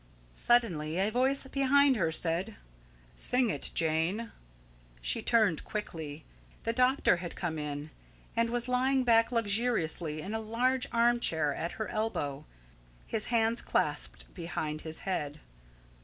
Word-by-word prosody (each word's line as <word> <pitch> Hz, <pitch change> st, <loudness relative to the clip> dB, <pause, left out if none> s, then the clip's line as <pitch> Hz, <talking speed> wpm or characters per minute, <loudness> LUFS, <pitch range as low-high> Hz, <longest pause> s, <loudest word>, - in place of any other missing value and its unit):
Suddenly 170 Hz, -, +2 dB
a 195 Hz, +3 st, +1 dB
voice 265 Hz, +4 st, +1 dB
behind 275 Hz, 0 st, +4 dB
her 170 Hz, -7 st, +1 dB
said: 170 Hz, +6 st, -1 dB, 0.6 s
"Sing 250 Hz, -3 st, +2 dB
it, 145 Hz, -, -3 dB
Jane." 165 Hz, +8 st, 0 dB, 0.7 s
She -, -, 0 dB
turned 215 Hz, -9 st, +3 dB
quickly. 160 Hz, -8 st, -6 dB, 0.4 s
The 230 Hz, -, 0 dB
doctor 255 Hz, -5 st, +3 dB
had 175 Hz, -1 st, -6 dB
come 160 Hz, -3 st, -3 dB
in, 150 Hz, +1 st, -5 dB, 0.4 s
and 230 Hz, 0 st, +2 dB
was 240 Hz, +1 st, -1 dB
lying 260 Hz, +1 st, +2 dB
back 230 Hz, -1 st, +4 dB
luxuriously 205 Hz, -9 st, 0 dB
in 195 Hz, +6 st, -5 dB
a 220 Hz, -, -1 dB
large 250 Hz, +4 st, 0 dB
arm 235 Hz, +1 st, +3 dB
chair 155 Hz, -9 st, +2 dB
at 170 Hz, -, -4 dB
her 220 Hz, -, -4 dB
elbow, 155 Hz, -10 st, -2 dB, 0.6 s
his 215 Hz, -1 st, -2 dB
hands 230 Hz, 0 st, +1 dB
clasped -, -, -1 dB
behind 155 Hz, -3 st, -4 dB
his 160 Hz, 0 st, -4 dB
head. 150 Hz, -6 st, -3 dB
215 Hz, 135 wpm, -31 LUFS, 160-240 Hz, 0.7 s, behind